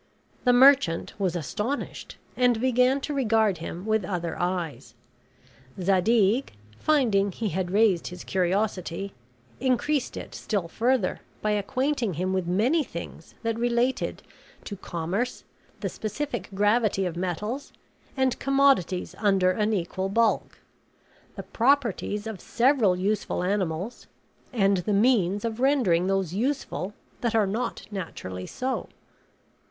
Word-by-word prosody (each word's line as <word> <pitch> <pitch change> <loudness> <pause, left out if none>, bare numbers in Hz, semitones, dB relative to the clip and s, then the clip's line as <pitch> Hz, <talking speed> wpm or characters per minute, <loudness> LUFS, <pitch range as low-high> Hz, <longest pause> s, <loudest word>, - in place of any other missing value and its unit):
The 250 - +6
merchant 255 -9 +5
was 185 -3 0
astonished, 210 - -4 0.2
and 245 -2 +3
began 255 +2 +3
to 295 - -3
regard 220 - +2
him 170 +3 -6
with 220 -1 +1
other 175 -2 -3
eyes. 175 -3 -3 0.8
Zadig, 200 +6 +2 0.3
finding 220 -10 +2
he 215 +3 -3
had 185 0 -2
raised 200 -3 +3
his 180 - -8
curiosity, 190 0 -1 0.5
increased 260 +2 0
it - - -7
still 200 -6 -2
further 235 +2 0 0.2
by 215 - +2
acquainting 240 - 0
him 185 +4 -1
with 185 -2 -1
many 240 - +2
things 170 - -9
that 230 0 -1
related 240 +2 0 0.4
to 205 - -6
commerce, 185 +7 -3 0.4
the - - -1
specific 240 +4 -4
gravity 205 -1 +2
of 175 -2 -3
metals, 195 - -3 0.5
and 265 -2 +1
commodities 270 -10 +2
under 195 -3 +3
an 210 +3 0
equal 190 -1 -2
bulk; 230 +3 +1 0.8
the - - -6
properties 230 -5 +1
of 220 -4 -6
several 235 -6 +3
useful 195 0 -1
animals; 190 +2 -2 0.4
and 195 -5 +3
the 180 +4 -1
means 205 -2 +3
of 225 0 -3
rendering 240 -11 +3
those 195 -3 0
useful 210 - -2 0.3
that 235 -2 0
are 220 -2 +4
not 230 +5 -3
naturally 95 - -6
so. 260 +1 -3
210 Hz, 125 wpm, -26 LUFS, 185-245 Hz, 0.8 s, The